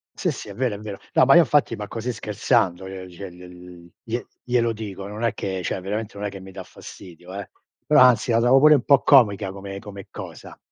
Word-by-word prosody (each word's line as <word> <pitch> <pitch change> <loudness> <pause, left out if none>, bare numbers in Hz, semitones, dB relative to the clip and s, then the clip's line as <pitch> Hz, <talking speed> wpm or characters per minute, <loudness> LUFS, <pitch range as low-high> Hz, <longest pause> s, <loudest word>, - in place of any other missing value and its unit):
Sì - - -1
sì, - - -8
è - - -8
vero, 120 0 -1
è - - -9
vero. 105 -2 -7 0.2
No, - - +5
ma 135 - +6
io 175 - +9
infatti, 145 -6 +2
ma 105 0 -6
così 115 +2 -4
scherzando 95 -4 0
l - - -8
le 95 -1 -8
cioè 95 +2 -9
gl 90 0 -13
gl 90 -1 -14 0.2
glie 120 0 -4 0.2
glielo 120 -2 +1
dico, 100 -3 -7
non 105 +3 -7
è 115 - +1
che 95 -1 -4
cioè - - -2
veramente 100 +2 -5
non 105 +1 -3
è - - -4
che 100 -1 -10
mi 95 0 -11
da 95 0 -8
fastidio, 90 -1 -13
eh. 100 0 -7 0.4
Però, - - +5
anzi, 125 -1 +5
la 115 - +3
trova 120 +3 +5
pure 150 +2 +7
un 130 - 0
po' 140 -2 +4
comica 105 -7 +4
come 100 0 -8
come 100 -2 -10
cosa. - - -10
100 Hz, 245 wpm, -23 LUFS, 95-115 Hz, 0.4 s, io